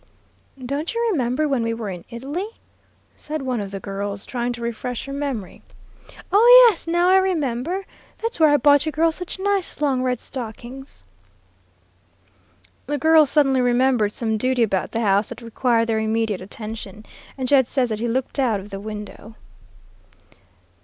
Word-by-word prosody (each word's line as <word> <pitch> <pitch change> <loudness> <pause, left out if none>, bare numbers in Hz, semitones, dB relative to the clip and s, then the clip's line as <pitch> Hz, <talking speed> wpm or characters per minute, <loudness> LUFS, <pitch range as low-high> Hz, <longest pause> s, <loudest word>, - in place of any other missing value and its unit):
"'Don't 280 - -4
you 465 0 +1
remember 265 - 0
when 270 -4 0
we 230 0 -1
were 220 -3 -5
in 175 -2 -8
Italy,' 295 - -6 0.6
said 305 -1 -5
one 250 -4 -2
of 200 - -5
the 195 0 -6
girls, 200 0 -5
trying 245 -1 -2
to 240 - -7
refresh 235 +1 -4
her 275 - -7
memory. 275 -9 -4 0.7
"'Oh, 485 +4 +8
yes, 390 -7 0
now 345 +1 +2
I 380 - +6
remember; 350 -1 -1 0.3
that's 460 -4 -4
where 315 -1 +6
I 290 - +5
bought 285 +2 +4
you - - 0
girls 325 +1 +2
such 360 +3 -5
nice 395 -1 -1
long 275 -4 +1
red 250 -2 -1
stockings.' 255 +2 -9 1.8
"The 290 +1 -1
girls 315 0 +5
suddenly 270 -4 +3
remembered 245 -3 +2
some 220 -1 -2
duty 255 0 +1
about 195 -4 -1
the 230 - -2
house 200 -1 +2
that - - -9
required 230 0 +1
their 225 -1 0
immediate 220 -2 -1
attention, 215 +1 -8 0.3
and 260 -1 -3
Jed 265 -2 +4
says 255 -3 0
that 215 -1 -3
he 235 - -1
looked 260 +4 -2
out 235 -6 +1
of 200 +2 -11
the 195 - -5
window." 210 +1 -8
250 Hz, 165 wpm, -22 LUFS, 220-300 Hz, 1.8 s, Oh